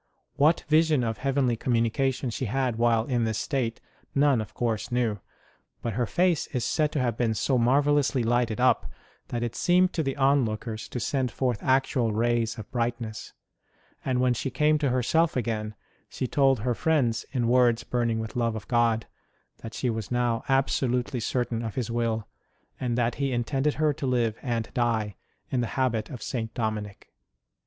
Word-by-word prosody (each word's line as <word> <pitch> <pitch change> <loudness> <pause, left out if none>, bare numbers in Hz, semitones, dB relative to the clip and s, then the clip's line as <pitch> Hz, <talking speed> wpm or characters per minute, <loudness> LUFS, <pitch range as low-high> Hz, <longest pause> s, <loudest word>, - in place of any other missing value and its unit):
What 150 +3 +3
vision 155 -3 +3
of 115 -1 -2
heavenly 135 -3 +1
communication 120 +2 0
she 130 - -3
had 125 0 -1
while 115 -1 +3
in 120 -2 0
this 110 -1 -1
state 120 -5 -2 0.4
none, 140 -4 +4
of 110 - -9
course, 115 -2 -2
knew; 120 -4 0 0.6
but 115 - -2
her 120 +2 0
face 175 0 +1
is 125 -2 -2
said 150 +2 +1
to 150 - 0
have 120 -3 0
been 115 -3 +1
so 125 +4 +1
marvellously 140 +1 +3
lighted 120 -1 +1
up 130 +1 +3 0.4
that 120 -1 -3
it 120 -1 -3
seemed 180 +1 +3
to 165 - 0
the 135 -2 -2
onlookers 115 -5 +1
to 125 - -4
send 130 +2 0
forth 120 -2 -1
actual 130 -4 +1
rays 115 +1 +1
of 110 - -9
brightness; 115 -3 -3 0.7
and 130 -2 0
when 125 -1 +3
she 135 - -3
came 150 +4 +2
to 145 -2 +1
herself 140 +7 +2
again 110 -3 -2 0.3
she - - -3
told 135 -2 +2
her 125 +2 0
friends, 120 -6 +1
in 125 -4 0
words 120 -1 +3
burning 120 -2 0
with 110 +2 -5
love 115 -2 0
of 110 - -7
God, 115 -2 +2 0.5
that 115 -1 -8
she 125 - 0
was 110 -2 -4
now 120 -2 0
absolutely 130 -2 +1
certain 120 0 -1
of 110 -3 -5
His 120 -3 -2
will, 115 -2 -1 0.5
and 125 -2 -1
that 120 -1 +1
He 135 -1 +1
intended 135 +4 0
her 155 -1 +2
to 135 - -4
live 120 -4 +1
and 115 -4 -2
die 110 -4 0 0.4
in 125 - +1
the 120 - -1
habit 120 -5 0
of 125 -6 -7
St. 115 -3 -3
Dominic. 110 -3 -4
120 Hz, 180 wpm, -27 LUFS, 115-135 Hz, 0.7 s, none